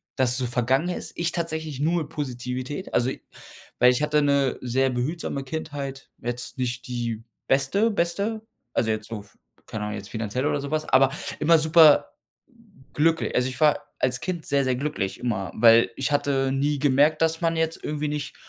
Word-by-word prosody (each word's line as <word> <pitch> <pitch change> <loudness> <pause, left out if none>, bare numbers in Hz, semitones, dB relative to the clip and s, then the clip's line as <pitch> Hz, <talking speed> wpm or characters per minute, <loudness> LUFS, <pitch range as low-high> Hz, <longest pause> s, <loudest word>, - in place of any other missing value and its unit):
dass 130 -2 +2
es 125 - +3
so 130 - 0
vergangen 130 +7 +1
ist. 175 - -5
Ich 170 0 -1
tatsächlich 160 -4 -4
nur 165 +3 +1
mit 150 - -6
Positivität. 130 +2 -5
Also, 125 +2 +2
ich - - -6 0.6
weil 125 +1 +7
ich 125 - -1
hatte 150 0 +2
'ne 140 -2 +2
sehr 130 +2 +1
behutsame 135 +2 -3
Kindheit. 140 -2 -6
Jetzt 120 +1 -5
nicht 125 0 -3
die 120 -2 -3 0.2
beste, 195 +12 +2
beste, 200 +4 -1 0.3
also, 110 - +1
jetzt 110 0 -2
so 115 - -5
f 100 0 -17 0.3
keine 110 -1 -5
Ahnung, 105 0 -4
jetzt 100 0 -8
finanziell 115 +4 -3
oder 145 - 0
so 140 - -5
was, 155 0 -1
aber 135 0 +5 0.3
immer 165 +2 +5
super 160 - +5 0.8
glückli 165 +2 +1
also, 125 +1 +2
ich 130 - -8
war 150 -1 +5 0.2
als 125 0 0
Kind 175 -4 -4
sehr, 140 -1 +1
sehr 130 - +1
glücklich 130 -8 -3
immer, 100 -6 -2
weil 115 +1 +6
ich 135 +1 -2
hatte 135 -2 +1
nie 145 +2 0
gemerkt, 145 +3 +3
dass 165 +1 0
man 165 0 +1
jetzt 160 0 -1
irgendwie 150 0 -2
nicht 150 0 -4
140 Hz, 190 wpm, -25 LUFS, 125-155 Hz, 0.8 s, weil